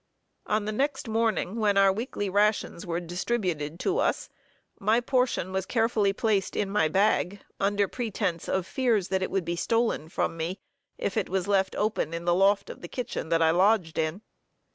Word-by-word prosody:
On 215 Hz, -1 st, 0 dB
the 215 Hz, -, -2 dB
next 270 Hz, +3 st, -1 dB
morning, 225 Hz, -2 st, 0 dB
when 210 Hz, -3 st, +2 dB
our 195 Hz, -1 st, +5 dB
weekly 210 Hz, -1 st, -3 dB
rations 205 Hz, -3 st, +1 dB
were 170 Hz, 0 st, -1 dB
distributed 175 Hz, -3 st, -2 dB
to 390 Hz, +5 st, +1 dB
us, -, -, 0 dB, 0.5 s
my 215 Hz, +4 st, +3 dB
portion 250 Hz, -6 st, 0 dB
was 190 Hz, 0 st, -2 dB
carefully 225 Hz, -3 st, +2 dB
placed 200 Hz, -2 st, 0 dB
in 200 Hz, -2 st, -1 dB
my 180 Hz, -6 st, +3 dB
bag, 195 Hz, +2 st, +1 dB, 0.2 s
under 200 Hz, 0 st, +2 dB
pretence 200 Hz, -9 st, -3 dB
of 190 Hz, -2 st, 0 dB
fears 225 Hz, -4 st, 0 dB
that 190 Hz, -1 st, 0 dB
it 185 Hz, -, -1 dB
would 190 Hz, -3 st, -1 dB
be 170 Hz, +1 st, -2 dB
stolen 225 Hz, -4 st, 0 dB
from 165 Hz, -, -1 dB
me, 165 Hz, +3 st, -3 dB, 0.4 s
if 200 Hz, -, -2 dB
it 210 Hz, -, 0 dB
was 190 Hz, 0 st, -1 dB
left 195 Hz, -1 st, +1 dB
open 210 Hz, -6 st, -1 dB
in 170 Hz, 0 st, -5 dB
the 175 Hz, -, +3 dB
loft 195 Hz, +3 st, +3 dB
of -, -, -12 dB
the 175 Hz, -, -7 dB
kitchen 245 Hz, -6 st, -4 dB
that 165 Hz, 0 st, +3 dB
I 160 Hz, -, +5 dB
lodged 185 Hz, -1 st, +2 dB
in. 160 Hz, +6 st, -2 dB
195 Hz, 185 wpm, -27 LUFS, 175-220 Hz, 0.5 s, our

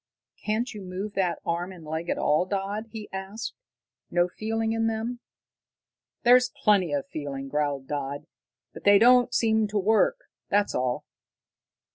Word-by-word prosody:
"Can't 220 Hz, +4 st, -1 dB
you 210 Hz, -, -8 dB
move 190 Hz, +3 st, -5 dB
that 185 Hz, -3 st, 0 dB
arm 175 Hz, +2 st, -2 dB
and 175 Hz, -4 st, -12 dB
leg 160 Hz, +3 st, -4 dB
at -, -, 0 dB
all, 150 Hz, +5 st, +2 dB
Dodd?" 200 Hz, +3 st, -3 dB
he 220 Hz, -2 st, -7 dB
asked. 195 Hz, +4 st, -5 dB, 0.6 s
"No 175 Hz, 0 st, +2 dB
feeling 220 Hz, +4 st, -2 dB
in 225 Hz, 0 st, +1 dB
them?" 225 Hz, +2 st, -2 dB, 1.0 s
"There's 250 Hz, +1 st, +6 dB
plenty 195 Hz, -6 st, +2 dB
of 145 Hz, -1 st, -1 dB
feeling," 140 Hz, -3 st, -5 dB
growled 145 Hz, -2 st, -1 dB
Dodd, 140 Hz, 0 st, -4 dB, 0.5 s
"but -, -, -11 dB
they 205 Hz, 0 st, +7 dB
don't 245 Hz, +2 st, +6 dB
seem 220 Hz, -3 st, +2 dB
to 210 Hz, 0 st, -2 dB
work, 220 Hz, -, +3 dB, 0.3 s
that's 205 Hz, 0 st, +2 dB
all." 125 Hz, -1 st, -1 dB
200 Hz, 150 wpm, -26 LUFS, 160-220 Hz, 1.0 s, they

